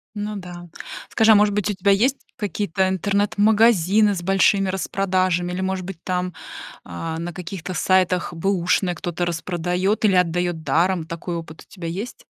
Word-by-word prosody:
Ну 210 0 -4
да. 175 -2 -9 0.4
Скажи, 220 0 +4
а, - - +8
может 205 0 +4
быть, 210 0 -1
у - - 0
тебя 190 +1 +2
есть 255 +8 +2 0.2
какие-то 200 -3 -1
интернет-магазины 205 +1 +3
с 175 - -5
большими 195 +1 +3
распродажами 185 -2 0
или, 180 +1 -3
может 190 -1 -2
быть, 180 -3 -9
там, 180 -1 -2 0.5
а, 160 - -5
на 170 +1 -5
каких-то 180 0 -6
сайтах 185 -1 +1
бэушные 180 0 0
кто-то 175 +1 -3
распродает 180 +4 -1
или 200 -3 +4
отдает 175 -1 0
даром? 165 +3 +1
Такой 170 +1 -5
опыт 160 -1 -8
у - - -26
тебя 175 -4 -6
есть? 200 +9 -6
185 Hz, 160 wpm, -22 LUFS, 175-200 Hz, 0.5 s, а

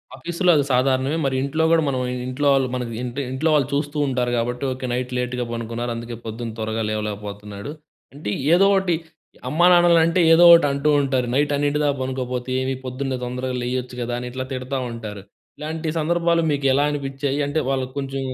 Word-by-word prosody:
ఆఫీస్‌లో 175 +6 +1
అది 145 - +3
సాధారణమే. 130 +3 +2
మరి 135 -1 0
ఇంట్లో 155 +4 0
కూడా, 165 -1 +5
మనం 130 -2 0 0.2
ఇంట్లో 130 +3 -1
వాళ్ళు, 135 -1 +2
మన 125 - -2 0.2
ఇంటి 125 +3 -4
ఇంట్లో 140 +5 0
వాళ్ళు 140 -4 +2
చూస్తూ 145 +1 -2
ఉంటారు, 125 -2 0
కాబట్టి. 120 +2 -2
ఓకె. 130 0 -5
నైట్ 125 +1 -2
లేట్‌గా 125 0 -2
పడుకున్నారు, 115 +1 -4
అందుకే, 115 0 -6
పొద్దున 115 +1 -5
త్వరగా 110 +1 -2
లేవలేకపోతున్నాడు. 105 +1 -5 0.4
అంటే, 145 -7 -4 0.2
ఏదో 195 +3 +5
ఒకటి, 190 -3 +1 0.5
అమ్మానాన్నలంటే 175 +1 +5
ఏదో 170 +2 +6
ఒకటి 170 -3 +7
అంటూ 140 +2 0
ఉంటారు. 130 -3 0
"నైట్ 145 +2 +2
అన్నింటిదాకా 145 0 +1
పనుకోకపోతే 130 -1 -3
ఏమి? 130 +1 -1
పొద్దున్నే 130 +1 -3
తొందరగా 125 +1 -3
లేయొచ్చు 125 0 -3
కదా!" 120 0 -3
అని 125 - -5
ఇట్లా 130 +1 -4
తిడతా 130 +1 -3
ఉంటారు. 110 -3 -7 0.4
ఇలాంటి 160 +1 -4
సందర్భాలు 170 +1 +1
మీకు 140 -1 -1
ఎలా 140 +2 +3
అనిపిచ్చాయి? 140 -1 -3
అంటే 145 +3 -1
వాళ్ళకి 130 -1 -1
కొంచెం 135 -1 -3
130 Hz, 170 wpm, -22 LUFS, 125-145 Hz, 0.5 s, ఒకటి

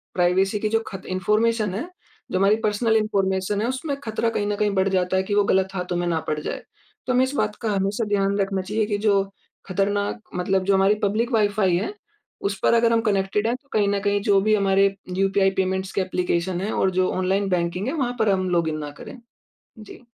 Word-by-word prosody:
Privacy 190 +3 +2
की 215 - -1
जो 225 +1 +2
खत 195 -2 -8
इन्फ़ॉर्मेशन 210 +2 +1
है, 285 - -4 0.4
जो 185 - 0
हमारी 200 +2 +4
पर्सनल 220 +2 +2
इन्फ़ॉर्मेशन 200 -1 0
है 230 - 0
उसमें 275 +3 -3
ख़तरा 225 +1 0
कहीं 205 -2 -2
न 205 - 0
कहीं 210 -1 +1
बढ़ 190 0 +2
जाता 185 0 +1
है 190 - +1
कि 205 +1 -2
वो 205 - +4
गलत 190 -1 +2
हाथों 180 -1 -3
में 175 0 -1
ना 165 -2 0
पड़ 155 0 -1
जाए। - - -5 0.4
तो 255 - +1
हमें 255 +1 +4
इस 260 - -5
बात 210 -5 0
का 220 -2 -1
हमेशा 200 +4 -1
ध्यान 200 0 +1
रखना 195 -1 0
चाहिए 210 +3 -1
कि 205 - -1
जो 200 -1 +4 0.4
ख़तरनाक 200 +3 -1 0.2
मतलब 185 +1 0
जो 200 - +3
हमारी 195 +2 +4
पब्लिक 225 +5 0
वाइ-फ़ाई 205 -4 +2
है 295 - -3 0.6
उस 195 -1 -5
पर - - +4
अगर 230 0 +3
हम 230 - +3
कनेक्टेड 195 +2 0
है 240 - +1
तो 280 +2 -16
कहीं 205 -2 +2
न 200 0 0
कहीं 205 0 +1
जो 195 - +5
भी 215 +1 +3
हमारे 195 0 +3 0.2
यूपीआई 195 0 +2
पेमेंट्स 190 0 -2
के 195 - +1
ऐप्लीकेशन 180 -1 -1
है 210 - -2
और 190 - +1
जो 185 - +2
ऑनलाइन 190 +2 0
बैंकिंग 180 +4 -1
है 270 - -1
वहाँ 250 -5 -1
पर 220 - +3
हम 185 -1 +1
लॉगिन 165 -3 0
ना 150 -1 -6
करें। 265 - -9 0.6
जी। 220 +3 -13
200 Hz, 225 wpm, -23 LUFS, 190-215 Hz, 0.6 s, जो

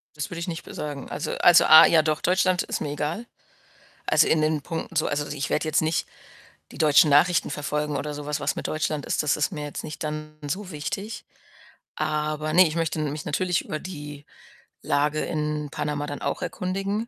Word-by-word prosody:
Das 150 -2 -4
würde 170 -2 -6
ich 170 - -4
nicht 170 -1 -5
be - - -11
sagen. 145 -3 -6
Also - - -4
also, 175 0 +6
A 160 +1 +10
ja, 165 -2 +5
doch, 155 0 -1
Deutschland 185 0 +2
ist - - -4
mir 145 - -3
egal. 160 +10 -3 0.8
Also, - - +4
in 155 - +3
den 155 -1 +1
Punkten 165 +1 -6
so 155 - +2
also, 145 0 -2
ich 145 -1 -4
werde 155 - 0
jetzt 155 0 +2
nicht 160 +1 0 0.6
die - - -11
deutschen 150 0 +5
Nachrichten 165 +5 +4
verfolgen 150 0 -2
oder 150 +2 -3
so 145 0 -7
was. 150 0 -2
Was 145 - 0
mit - - -3
Deutschland 155 -2 -2
ist, - - 0
das 145 - +1
ist 150 - 0
mir 150 -4 -5
jetzt 145 - -6
nicht 155 - -7
dann 155 0 -5
so 190 +4 -4
wichtig. 195 +9 -5 0.7
Aber, 155 0 -2
ne, 180 0 +7
ich 155 - -4
möchte 165 -2 -1
mich 150 -1 -3
natürlich 180 +3 0
über 155 - -4
die 150 -5 -8 0.6
Lage 150 +1 +1
in 150 -1 -2
Panama 145 0 -3
dann 145 - -6
auch - - -2
erkundigen. 195 +4 -3
155 Hz, 205 wpm, -25 LUFS, 150-165 Hz, 0.8 s, A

